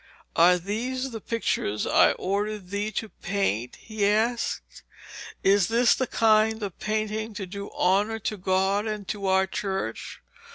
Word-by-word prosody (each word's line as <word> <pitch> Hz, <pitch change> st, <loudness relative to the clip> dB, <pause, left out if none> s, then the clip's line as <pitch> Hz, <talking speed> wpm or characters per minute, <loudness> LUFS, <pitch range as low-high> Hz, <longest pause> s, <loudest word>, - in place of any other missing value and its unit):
'Are 180 Hz, +2 st, +6 dB
these 250 Hz, +8 st, -3 dB
the 225 Hz, -2 st, -6 dB
pictures 105 Hz, -, -1 dB
I -, -, +5 dB
ordered 200 Hz, 0 st, -3 dB
thee 205 Hz, +1 st, -1 dB
to 220 Hz, +2 st, -3 dB
paint?' 175 Hz, -, -2 dB
he 215 Hz, -2 st, -5 dB
asked. 225 Hz, +3 st, -1 dB, 0.6 s
'Is 195 Hz, -1 st, +4 dB
this 235 Hz, +2 st, +4 dB
the 260 Hz, -, -1 dB
kind 220 Hz, 0 st, +3 dB
of 195 Hz, -4 st, -5 dB
painting 215 Hz, 0 st, -2 dB
to 200 Hz, -2 st, -4 dB
do 200 Hz, +2 st, -7 dB
honour 200 Hz, +5 st, +1 dB
to 210 Hz, -, -2 dB
God 190 Hz, +2 st, +1 dB
and 210 Hz, -2 st, -4 dB
to 200 Hz, -2 st, -3 dB
our 190 Hz, 0 st, +4 dB
Church? 195 Hz, 0 st, -4 dB
205 Hz, 150 wpm, -26 LUFS, 190-220 Hz, 0.6 s, Are